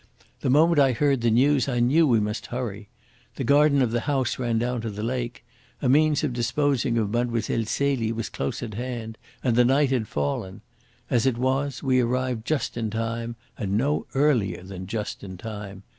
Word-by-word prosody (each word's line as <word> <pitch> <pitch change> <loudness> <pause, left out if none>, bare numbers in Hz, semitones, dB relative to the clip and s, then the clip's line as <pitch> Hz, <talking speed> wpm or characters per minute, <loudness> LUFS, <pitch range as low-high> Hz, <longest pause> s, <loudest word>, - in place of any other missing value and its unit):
The - - -1
moment 160 +4 +5
I 135 -2 +5
heard 140 0 +1
the 120 - +3
news 130 +3 +3
I 120 -2 0
knew 145 +7 +4
we 120 -4 +4
must 105 +1 -3
hurry. 110 -5 -5 0.5
The - - -3
garden 140 -1 +4
of 120 - 0
the 120 - +1
house 135 -4 0
ran 120 -2 0
down 120 +1 -1
to 115 - -3
the 105 0 -5
lake. 120 0 -3 0.3
A 135 - -1
means 150 +3 +3
of 145 -5 0
disposing 125 0 0
of 105 -3 0
Mlle. 120 0 0 0.3
Celie 130 -1 0
was 115 -1 -3
close 120 - -4
at 110 -3 -6
hand. 115 -1 -5 0.2
And 120 -3 +2
the 125 - +6
night 135 +2 +3
had 120 -5 0
fallen. 85 +7 -3 0.5
As 125 0 +3
it 125 -3 +1
was, 135 +2 -1
we 130 -2 +3
arrived 125 -1 -1
just 145 -6 -1
in 115 -2 -1
time, 115 +1 -3 0.2
and 100 -3 -1
no 145 +6 0
earlier 135 -10 +2
than 95 -1 -8
just 105 +1 -4
in 95 -2 -8
time. 100 -2 -8
120 Hz, 195 wpm, -25 LUFS, 110-135 Hz, 0.5 s, the